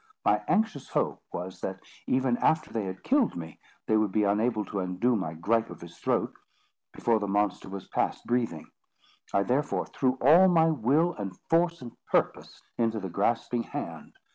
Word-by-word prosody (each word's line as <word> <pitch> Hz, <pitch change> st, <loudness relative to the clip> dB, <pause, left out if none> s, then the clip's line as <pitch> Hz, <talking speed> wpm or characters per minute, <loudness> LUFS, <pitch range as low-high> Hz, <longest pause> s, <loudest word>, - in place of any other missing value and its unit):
My -, -, +3 dB
anxious 215 Hz, -, 0 dB
hope -, -, -1 dB
was, 90 Hz, +1 st, -6 dB
that, 95 Hz, 0 st, -4 dB, 0.3 s
even 130 Hz, -1 st, +2 dB
after 155 Hz, +4 st, +1 dB
they 110 Hz, -3 st, -1 dB
had 95 Hz, 0 st, -6 dB
killed 270 Hz, -3 st, +2 dB
me, 80 Hz, -2 st, -8 dB, 0.3 s
they 110 Hz, -, +3 dB
would 110 Hz, -2 st, +1 dB
be 105 Hz, +2 st, +2 dB
unable 105 Hz, +2 st, +1 dB
to 100 Hz, -, -4 dB
undo 95 Hz, +7 st, +1 dB
my 80 Hz, -6 st, -3 dB
gripe 115 Hz, +7 st, +1 dB
of -, -, -10 dB
his 85 Hz, 0 st, -11 dB
throat, -, -, 0 dB, 0.6 s
before 115 Hz, -2 st, +1 dB
the 100 Hz, -, -3 dB
monster 100 Hz, 0 st, 0 dB
was 95 Hz, -1 st, -7 dB
past -, -, -1 dB
breathing. 115 Hz, -10 st, -1 dB, 0.7 s
I 100 Hz, -, +2 dB
therefore 135 Hz, +7 st, 0 dB
threw 130 Hz, -1 st, 0 dB
all 165 Hz, +8 st, +7 dB
my 165 Hz, -3 st, +4 dB
will, 155 Hz, +6 st, +2 dB
and 95 Hz, -, -6 dB
force, 170 Hz, -3 st, +2 dB
and 120 Hz, -, -8 dB, 0.2 s
purpose, -, -, -1 dB, 0.2 s
into 115 Hz, -1 st, +1 dB
the 95 Hz, -2 st, -5 dB
grasping 115 Hz, +6 st, 0 dB
hand. -, -, -7 dB
115 Hz, 175 wpm, -28 LUFS, 95-135 Hz, 0.7 s, all